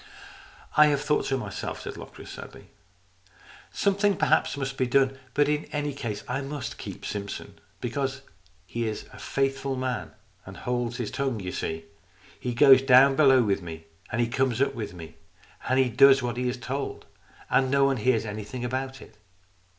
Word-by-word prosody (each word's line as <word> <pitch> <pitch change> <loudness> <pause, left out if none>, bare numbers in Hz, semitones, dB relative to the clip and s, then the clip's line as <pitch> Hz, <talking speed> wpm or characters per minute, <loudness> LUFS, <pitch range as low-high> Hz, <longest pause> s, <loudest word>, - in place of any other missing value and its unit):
" - - -19
I 150 - +9
have 145 -1 +1
thought 150 0 +1
so 135 - +1
myself," 125 - -5
said - - -6
Locris, - - -10
sadly, - - -11 0.6
" 95 +1 -27 0.3
Something 200 0 +2
perhaps - - +2
must 135 -1 -3
be 130 -1 0
done. 135 +1 +2 0.2
But 145 0 +4
in 150 0 0
any 145 -1 -3
case 110 -6 -5
I 125 +3 -2
must 140 -1 -5
keep - - -7
Simpson, 100 -1 -6 0.2
because 135 +2 -2 0.4
he 115 +6 -3
is 110 - -4
a - - -11
faithful 135 0 -1
man 130 -3 -3 0.3
and 95 +1 -11
holds 120 -1 -2
his 120 -4 -3
tongue. 135 -5 -1
You 90 -2 -4
see? 80 -2 -4 0.5
He 125 -1 -3
goes 135 0 +8
down 135 +1 +6
below 135 -4 +6
with 100 -2 0
me, 80 -2 -8 0.3
and 120 - -1
he 120 - +3
comes 130 -1 0
up 135 0 +2
with 105 -6 -6
me, 80 -2 -10 0.5
and 130 - +3
he 130 -1 +4
does 135 +3 +6
what 120 -1 -2
he 125 0 -1
is 125 - -3
told, 135 +3 -4 0.4
and 130 -1 +2
no 140 0 +4
one 135 -1 +2
hears 115 -1 +2
anything 110 +4 -5
about 130 +1 -4
it. 105 - -18
130 Hz, 185 wpm, -27 LUFS, 115-135 Hz, 0.6 s, I